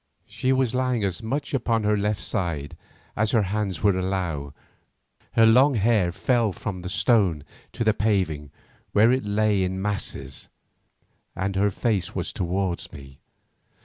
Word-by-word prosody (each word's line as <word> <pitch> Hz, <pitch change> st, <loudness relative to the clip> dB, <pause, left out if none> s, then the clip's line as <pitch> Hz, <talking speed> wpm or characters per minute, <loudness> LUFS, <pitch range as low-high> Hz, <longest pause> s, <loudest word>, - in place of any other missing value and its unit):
She 130 Hz, -, -2 dB
was 130 Hz, -3 st, +1 dB
lying 125 Hz, -3 st, 0 dB
as 100 Hz, +3 st, -2 dB
much 140 Hz, +6 st, -3 dB
upon 115 Hz, -4 st, +1 dB
her 105 Hz, 0 st, +2 dB
left 105 Hz, -2 st, -1 dB
side 85 Hz, -9 st, -3 dB, 0.4 s
as 110 Hz, 0 st, 0 dB
her 115 Hz, -3 st, +4 dB
hands 100 Hz, -2 st, -2 dB
would 100 Hz, -3 st, +4 dB
allow, 90 Hz, -7 st, -2 dB, 0.8 s
her 115 Hz, -, +5 dB
long 130 Hz, +5 st, +5 dB
hair 105 Hz, -4 st, +2 dB
fell 115 Hz, +3 st, +1 dB
from 95 Hz, -1 st, -5 dB
the 90 Hz, -, -5 dB
stone 95 Hz, -, +2 dB, 0.3 s
to -, -, -2 dB
the 110 Hz, -1 st, +3 dB
paving 95 Hz, -9 st, 0 dB, 0.4 s
where 110 Hz, +3 st, +5 dB
it 130 Hz, -3 st, 0 dB
lay 105 Hz, -1 st, +1 dB
in 95 Hz, +1 st, -2 dB
masses, 95 Hz, -9 st, -4 dB, 0.9 s
and 95 Hz, +1 st, -2 dB
her 100 Hz, +2 st, +3 dB
face 100 Hz, -4 st, -1 dB
was -, -, -3 dB
towards 90 Hz, 0 st, -2 dB
me. 70 Hz, -3 st, -12 dB
100 Hz, 150 wpm, -24 LUFS, 90-115 Hz, 0.9 s, her